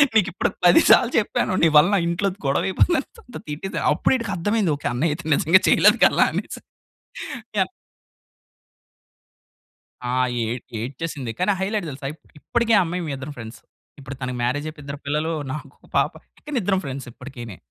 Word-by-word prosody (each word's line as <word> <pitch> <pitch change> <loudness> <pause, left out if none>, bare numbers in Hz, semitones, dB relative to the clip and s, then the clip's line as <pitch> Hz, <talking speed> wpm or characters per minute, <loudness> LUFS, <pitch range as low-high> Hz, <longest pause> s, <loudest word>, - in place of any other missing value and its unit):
నీకు 205 -3 +4
ఇప్పుడు - - 0 0.2
10 175 - +7
సార్లు 250 -1 +6
చెప్పాను, 210 -3 0
నీ - - +7
వల్ల 150 +5 +6
నా - - +3
ఇంట్లో 170 +4 0 0.2
గొడవ 135 0 +1
అయిపోయింది 255 - -1
తిట్టేసాను. 150 +6 -4
అప్పుడు 150 - +1
ఈడికి 230 -4 -4
అర్థమైంది 200 -1 +1
ఓకె. 145 - -4
అన్నయ్య 145 +6 +1
అయితే 170 - -11
నిజంగా 175 +6 +4
చేయలేదు - - +5
కదా! - - +4
అనేసి - - -5 1.0
యన్ - - +2 2.4
ఆ! 125 - -2 0.3
ఏ - - -1 0.3
ఏడ్చేసింది. 130 +1 -5
కానీ 185 +3 +2
హైలైట్ 200 -1 -1
తెలుసా! 135 +1 -6
ఇ - - -15 0.2
ఇప్పటికి 235 +6 0
ఆ - - +4
అమ్మాయి 180 +2 -3
మేము 150 - -3
ఇద్దరు 135 +3 -7
ఫ్రెండ్స్. 115 0 -9 0.4
ఇప్పుడు 135 0 -8
తనకి 125 -1 -3
మ్యారేజ్ 135 +5 -1
అయిపోయి 150 -1 -12
ఇద్దరు 140 0 -6
పిల్లలు. 150 +3 -1 0.2
నాకు 145 -2 -6
ఒక - - -21
పాప. - - +2 0.3
కానీ 295 -3 -3
ఇద్దరం 190 0 +1
ఫ్రెండ్స్. 135 -1 -6
ఇప్పటికీని. 120 -6 -9
155 Hz, 165 wpm, -22 LUFS, 135-195 Hz, 2.4 s, 10